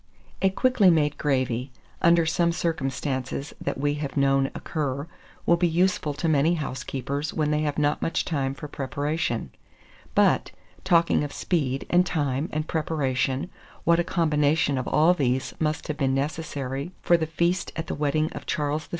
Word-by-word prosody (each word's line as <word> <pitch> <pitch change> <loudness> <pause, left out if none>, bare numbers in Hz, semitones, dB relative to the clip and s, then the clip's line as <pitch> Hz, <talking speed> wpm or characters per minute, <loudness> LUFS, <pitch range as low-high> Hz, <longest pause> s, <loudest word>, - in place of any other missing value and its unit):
A 190 - +4
quickly 225 -1 +4
made 150 -3 +3
gravy, 130 -2 0 0.3
under 170 0 +5
some 170 +1 +2
circumstances 135 -4 -2
that - - -2
we 145 +1 +1
have 145 -1 -4
known 135 -1 +3
occur, 145 -2 -3 0.4
will 170 - +4
be 175 0 +2
useful 170 -3 +1
to 155 +3 -2
many 155 +2 +3
housekeepers 140 0 -4
when 155 -1 +1
they 150 0 +1
have 150 -2 -1
not 150 0 +1
much 165 - 0
time 135 -4 -1
for 150 - -7
preparation. 145 - -2 0.6
But, - - +3 0.3
talking 170 -3 +3
of 145 - -4
speed, 135 -7 -1
and 180 +1 +4
time, 145 -4 -1
and 155 0 -2
preparation, 145 0 -1 0.3
what 170 0 +4
a - - +3
combination 150 -5 +2
of 130 - -4
all 160 +4 +4
these 130 -6 0
must 155 -1 -1
have 150 - -3
been 135 -2 +1
necessary 140 +1 -3
for 175 - +5
the 160 -2 0
feast 170 +3 0
at 165 - -3
the - - -4
wedding 150 +1 0
of - - -8
Charles 150 +1 -1
VI. - - -32
150 Hz, 165 wpm, -25 LUFS, 135-165 Hz, 0.6 s, under